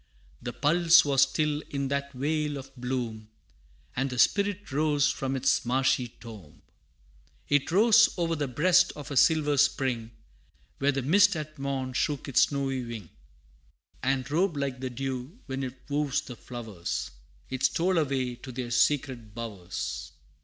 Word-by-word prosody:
The 120 - -4
pulse 165 +5 +5
was 140 -2 +3
still 150 +2 +1
in 140 -1 -2
that 140 0 -2
vale 150 +2 -1
of 135 0 -10
bloom, 120 -4 -4 0.7
And 135 +2 0
the 125 - -5
Spirit 200 +5 +2
rose 145 0 +2
from 135 -1 -3
its 130 0 +2
marshy 130 0 +1
tomb. 110 -9 -13 0.9
It 145 0 +2
rose 225 +4 +6
o'er 165 -1 0
the 145 -2 -2
breast 180 +8 +3
of 145 -1 -8
a - - -3
silver 150 0 +4
spring, 125 -5 +1 0.7
Where 140 +1 +3
the 135 -1 -2
mist 195 +7 +5
at 155 -1 -6
morn 135 -2 -3
shook 145 +1 -1
its 135 - +3
snowy 135 -2 -2
wing, 115 -8 -7 0.9
And 130 0 0
robed 170 0 +1
like 135 -2 -2
the 130 0 -3
dew, 130 - -5
when 135 0 -4
it 130 -1 -5
woos 145 -1 0
the 125 - -9
flowers. 110 -7 -5 0.4
It 130 -1 -4
stole 175 +4 +2
away 130 -5 -1
to 130 +1 -9
their 125 -1 -5
secret 125 -6 0
bowers. 105 -7 -5
135 Hz, 155 wpm, -28 LUFS, 125-150 Hz, 0.9 s, rose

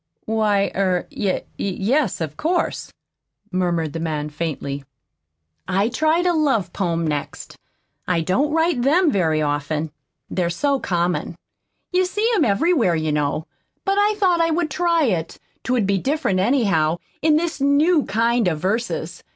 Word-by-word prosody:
"Why, 210 -3 +1
er 185 -2 0
y 195 -3 -1 0.2
yes, 205 - 0
of 155 -2 -3
course," 345 - -1 0.6
murmured 170 -4 0
the 165 - -4
man 150 -2 -3
faintly. 145 -3 -4 0.8
"I 200 +4 +1
tried 315 +6 +1
a 355 - +3
love 265 - +1
poem 170 -3 -1
next. 150 -2 -4 0.5
I 175 -2 +1
don't 260 - +1
write 320 -4 +1
them 310 +6 +3
very 160 - +1
often. 150 +1 -2 0.4
They're 175 -2 -1
so 280 +9 0
common. 175 -3 -1 0.6
You 370 0 +2
see 415 +4 0
'em 400 - +3
everywhere, 230 - +2
you 155 -1 -1
know. 150 +1 -1 0.4
But 395 0 +2
I 415 +1 +3
thought 365 -4 +2
I 330 - +2
would 325 -1 0
try 335 +1 +2
it 175 - -1 0.2
'twould 250 -5 0
be 195 0 +1
different, 270 - 0
anyhow, 185 - +2 0.2
in 310 0 +4
this 325 -2 -1
new 295 +3 +3
kind 230 +1 +1
of 160 -3 0
verses. 215 +8 -2
205 Hz, 150 wpm, -21 LUFS, -, 0.8 s, in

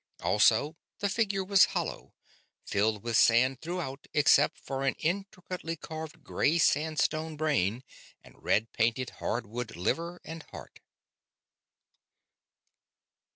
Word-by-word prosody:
Also, 115 +8 +3 0.2
the 200 - -1
figure 200 -2 0
was 195 0 +6
hollow; - - -5 0.5
filled 105 0 0
with 115 -1 -2
sand 125 +4 +4
throughout 160 -5 -5
except 150 0 +4
for 135 0 -5
an 135 - +1
intricately 185 -1 -3
carved 160 -1 -8
gray 155 +4 +1
sandstone 155 0 +1
brain 130 -7 0 0.4
and - - -16
red 110 +2 +1
painted 120 +2 0
hardwood 115 0 -3
liver 170 - -2
and 160 0 -7
heart. - - -11
150 Hz, 110 wpm, -29 LUFS, 120-170 Hz, 0.5 s, was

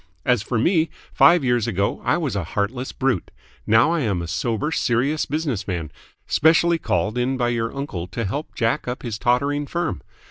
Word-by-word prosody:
As 125 -4 +3
for 115 +2 -2
me, 160 - +2 0.2
five 170 -2 +6
years 120 -3 +1
ago 100 -2 -1
I - - +2
was 150 -10 -2
a 100 - -1
heartless 110 +9 -2
brute. 130 -9 -1 0.4
Now 110 +8 +5
I 170 - +1
am 105 - 0
a - - -6
sober 115 - -1
serious 135 +2 +1
business 145 -10 -2
man, 85 -5 -3 0.3
specially 165 +2 +3
called 105 - -1
in 130 +2 0
by 120 -1 +1
your 115 -1 -1
uncle 120 -11 -5
to 110 +5 -4
help 145 +11 -4
jack 115 +5 0
up 125 +1 -4
his 110 -4 -4
tottering 140 +4 +1
firm. 170 - -2
125 Hz, 185 wpm, -22 LUFS, 105-145 Hz, 0.4 s, five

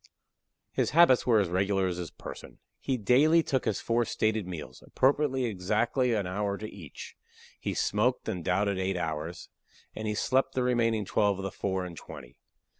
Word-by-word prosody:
His - - 0
habits 150 -9 +6
were 115 -3 +5
as 95 -4 0
regular 95 +2 +1
as 90 -1 -2
his 90 -3 -5
person. - - -10 0.2
He 130 - -1
daily 145 +10 +4
took 130 -4 -1
his 110 -4 0
four 120 +1 +1
stated 110 -3 -1
meals, 75 -8 -8
appropriating 135 -1 +1
exactly 110 +7 0
an 100 -3 -1
hour 100 +2 -2
to 110 - -6
each; 85 -9 -10 0.4
he - - -3
smoked 120 +5 +1
and 90 -3 -3
doubted 95 +2 +1
eight 95 0 -1
hours, 80 +1 -4 0.5
and 110 - -4
he 105 - -1
slept 130 +5 +1
the 130 - +1
remaining 115 -4 +1
twelve 100 0 +1
of 95 - -6
the 95 - -3
four 95 -1 -2
and 85 -2 -8
twenty. 60 -2 -11
105 Hz, 180 wpm, -29 LUFS, 90-120 Hz, 0.5 s, habits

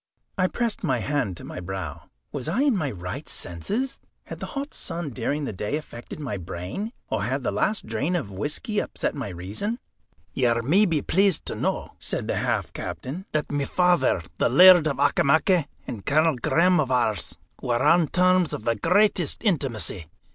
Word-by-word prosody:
I 185 -1 +2
pressed 235 +1 -2
my 135 -8 +1
hand 120 - -1
to - - -10
my - - -7
brow. 95 +1 -6 0.2
Was 140 -1 -5
I 210 - +1
in 280 -5 +3
my 155 -7 0
right 90 -5 -6
senses? 215 - -3 0.2
Had - - -8
the - - -5
hot 280 +1 -4
sun 165 -4 -4
during 140 +5 -2
the 110 - -4
day 105 +8 -2
affected 120 -3 -9
my 130 -9 -3
brain, 90 - -5 0.2
or - - 0
had 130 +6 -1
the - - 0
last 195 - 0
drain 125 +11 -1
of 135 - -2
whisky 150 - -2
upset - - -2
my 135 -7 -4
reason? 100 - -4 0.6
"You 120 -2 +2
may 185 - +4
be 160 -6 0
pleased 195 -2 +2
to - - -2
know," - - -2
said - - -3
the - - -1
half - - -1
captain, 130 - -6
"that 155 -1 -1
my 145 -1 0
father, 180 - +2 0.2
the - - +3
Laird 175 +4 +8
of 140 -4 -1
Auchimachie, 150 +4 +3 0.2
and 105 -5 -6
Colonel 155 +1 +3
Graham 170 +8 +3
of 140 -4 +1
Ours, 110 - 0 0.2
were 120 -1 0
on 170 -2 +5
terms 185 0 +3
of - - -4
the 115 0 +1
greatest 185 - +2
intimacy. 125 - -1
145 Hz, 185 wpm, -25 LUFS, 115-180 Hz, 0.6 s, Laird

